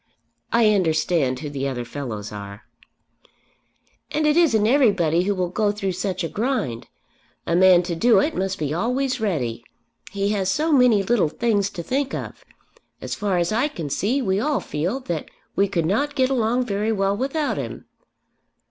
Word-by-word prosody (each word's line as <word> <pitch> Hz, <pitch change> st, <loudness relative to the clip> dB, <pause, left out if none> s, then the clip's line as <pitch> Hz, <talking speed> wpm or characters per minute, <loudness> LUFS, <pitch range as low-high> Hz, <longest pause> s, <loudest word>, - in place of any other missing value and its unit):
"I 225 Hz, -2 st, +4 dB
understand 160 Hz, -7 st, +1 dB
who 150 Hz, -, -5 dB
the 140 Hz, -1 st, -2 dB
other 125 Hz, -3 st, -4 dB
fellows 120 Hz, -5 st, -6 dB
are." 100 Hz, 0 st, -8 dB, 1.5 s
"And 305 Hz, 0 st, 0 dB
it 300 Hz, 0 st, +3 dB
isn't 260 Hz, -12 st, +4 dB
everybody 195 Hz, -, +3 dB
who 205 Hz, 0 st, 0 dB
will 180 Hz, -2 st, -1 dB
go 205 Hz, +2 st, +1 dB
through 200 Hz, -2 st, -3 dB
such 185 Hz, 0 st, -3 dB
a -, -, -1 dB
grind. 210 Hz, -, -2 dB, 0.6 s
A 170 Hz, -, 0 dB
man 180 Hz, -1 st, +6 dB
to 175 Hz, 0 st, -3 dB
do 225 Hz, +8 st, +4 dB
it 305 Hz, +2 st, +1 dB
must 190 Hz, 0 st, -2 dB
be 150 Hz, -1 st, -2 dB
always 250 Hz, +6 st, -1 dB
ready. 125 Hz, -, -2 dB, 0.5 s
He 200 Hz, 0 st, -1 dB
has 195 Hz, -3 st, 0 dB
so 310 Hz, +9 st, 0 dB
many 250 Hz, -7 st, +5 dB
little 195 Hz, -6 st, +2 dB
things 205 Hz, +1 st, 0 dB
to 175 Hz, -4 st, -7 dB
think 270 Hz, +7 st, -1 dB
of. -, -, -7 dB, 0.6 s
As -, -, -5 dB
far 200 Hz, -3 st, -1 dB
as 175 Hz, +2 st, 0 dB
I 235 Hz, +7 st, +2 dB
can 165 Hz, -, -6 dB
see 245 Hz, -, 0 dB
we 190 Hz, -2 st, +1 dB
all 290 Hz, +4 st, 0 dB
feel 180 Hz, -, -3 dB
that 170 Hz, -10 st, -4 dB, 0.3 s
we 200 Hz, -, +3 dB
could 175 Hz, -4 st, -1 dB
not 285 Hz, -, 0 dB
get 260 Hz, -1 st, +2 dB
along 245 Hz, 0 st, +1 dB
very 210 Hz, 0 st, -1 dB
well 195 Hz, -2 st, +1 dB
without 275 Hz, +6 st, -1 dB
him." -, -, -6 dB
200 Hz, 175 wpm, -22 LUFS, 170-245 Hz, 1.5 s, man